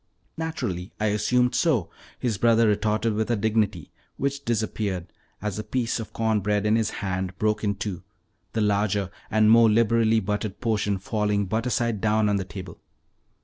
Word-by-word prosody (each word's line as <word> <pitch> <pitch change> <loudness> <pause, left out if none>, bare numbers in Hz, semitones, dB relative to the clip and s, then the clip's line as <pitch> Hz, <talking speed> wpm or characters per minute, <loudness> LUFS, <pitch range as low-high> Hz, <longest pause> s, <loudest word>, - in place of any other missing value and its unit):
"Naturally 120 - -4
I 110 0 +1
assumed 125 +4 +2
so," 135 - +1 0.3
his 115 -6 -2
brother 115 0 +4
retorted 110 +2 +1
with 110 +2 -1
a 120 - +2
dignity 105 -5 0 0.3
which 140 +1 -2
disappeared 105 -5 -2 0.3
as 105 -1 -2
the 110 - -3
piece 115 +2 -1
of 115 - -7
corn 110 -1 +1
bread 105 +1 0
in 105 +1 +3
his 110 -2 +1 0.2
hand 95 -1 -3
broke 105 +1 0
in 100 -1 +1
two, 100 -3 -4 0.5
the 115 - 0
larger 100 -2 +1 0.2
and 110 0 +4
more 115 0 +7
liberally 115 0 +3
buttered 105 0 -3
portion 105 -3 0
falling 105 0 0
butter 110 +6 -1
side 115 -3 0
down 110 -1 +2
on 100 - +2
the 95 - -2
table. 95 -1 -9
105 Hz, 170 wpm, -25 LUFS, 100-115 Hz, 0.5 s, more